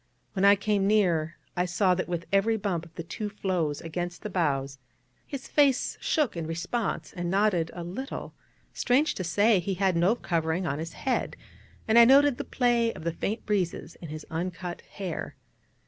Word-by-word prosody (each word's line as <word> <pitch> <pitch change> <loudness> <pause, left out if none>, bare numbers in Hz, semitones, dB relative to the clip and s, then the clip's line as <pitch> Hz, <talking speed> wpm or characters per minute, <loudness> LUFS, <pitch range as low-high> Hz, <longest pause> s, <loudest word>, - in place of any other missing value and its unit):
When 195 -1 +2
I 200 0 +8
came 205 0 0
quite 195 - +2
near, 170 -6 +2 0.2
I 180 - +1
saw 185 +1 +2
that 185 - -2
with 170 -1 -3
every 220 +3 +3
bump 190 -5 -2
of 160 - -25
the 170 - -5
two 205 +5 -5
floes 180 -7 -1
against 175 +1 -5
the 210 - -5
bows, 140 -6 -1 0.5
his 275 -2 -6
face 280 -3 +3
shook 295 -11 +1
in 165 -2 -4
response, 180 +7 -3
and 175 -2 -3
nodded 190 -4 +2
a 175 - -5
little; 215 - -6 0.4
strange 275 +5 +2
to 185 - -4
say, 200 +5 +3
he 190 +2 -2
had 190 -1 +1
no 175 +7 +3
covering 165 -3 -1
on 145 -2 -2
his 165 +1 -5
head, 265 -2 -1 0.5
and 225 +1 +6
I 235 - +10
noted 275 +1 +5
the - - -1
play 240 -2 +2
of - - -10
the 170 0 -1
faint 215 +6 -3
breezes 195 -5 -1
in 165 - -7
his 155 +1 -7
uncut 175 +1 -4
hair. 185 -5 -5
185 Hz, 190 wpm, -27 LUFS, 170-215 Hz, 0.5 s, I